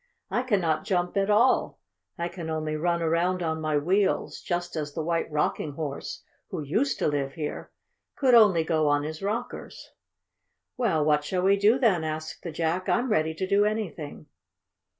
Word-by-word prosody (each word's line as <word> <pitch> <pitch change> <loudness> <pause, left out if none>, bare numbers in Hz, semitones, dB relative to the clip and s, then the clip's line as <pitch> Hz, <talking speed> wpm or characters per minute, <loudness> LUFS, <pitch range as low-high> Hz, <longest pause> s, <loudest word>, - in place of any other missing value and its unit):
I - - +1
cannot 180 -11 +1
jump 180 -1 -1
at 195 0 +1
all. 230 +5 +3 0.4
I 170 - -2
can 170 -2 -7
only 155 -1 -2
run 170 +2 0
around 175 +3 +1
on 160 -1 -2
my 155 -1 +1
wheels, 190 +7 0
just 175 -1 -3
as 150 -2 -4
the 160 - -2
White 165 0 -1
Rocking 150 0 -1
Horse, 145 -2 -5 0.3
who - - -4
used 220 - 0
to - - 0
live 140 -2 -1
here, 150 -2 -5 0.5
could 260 -3 +3
only 205 -8 +6
go 160 -2 +1
on 145 0 +2
his 155 +1 -5
rockers." 220 +5 -5 0.8
"Well, 190 -12 +1
what 150 -1 +3
shall 180 +4 -1
we 195 +1 +5
do 210 +5 +4
then?" 210 -11 +2
asked 155 0 -5
the 170 - -5
Jack. 165 +3 -1
"I'm 245 0 +1
ready 160 -3 +1
to 190 - -2
do 200 +2 +4
anything." 205 -9 -3
170 Hz, 175 wpm, -27 LUFS, 155-200 Hz, 0.8 s, only